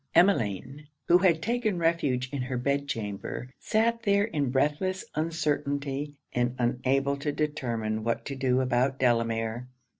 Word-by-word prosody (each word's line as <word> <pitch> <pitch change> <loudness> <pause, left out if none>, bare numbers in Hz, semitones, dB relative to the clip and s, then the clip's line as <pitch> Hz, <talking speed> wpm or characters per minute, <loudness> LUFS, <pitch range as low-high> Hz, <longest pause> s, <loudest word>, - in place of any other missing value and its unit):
Emmeline, 140 - +2 0.2
who 175 +1 +6
had 170 -4 +3
taken 230 -5 0
refuge 155 -7 +1
in 140 - -1
her 125 0 -2
bed 140 +3 0
chamber, 110 +1 -4
sat 230 +1 +1
there 200 -2 +3
in 150 - -1
breathless 150 +8 0
uncertainty, 145 -3 -1 0.2
and 120 0 0
unable 130 +3 +1
to 140 +1 -2
determine 115 -8 -2
what 115 +1 -1
to 140 - -4
do 130 -1 +2
about 130 +1 +1
Delamere. 115 -1 0
140 Hz, 140 wpm, -28 LUFS, 125-160 Hz, 0.2 s, who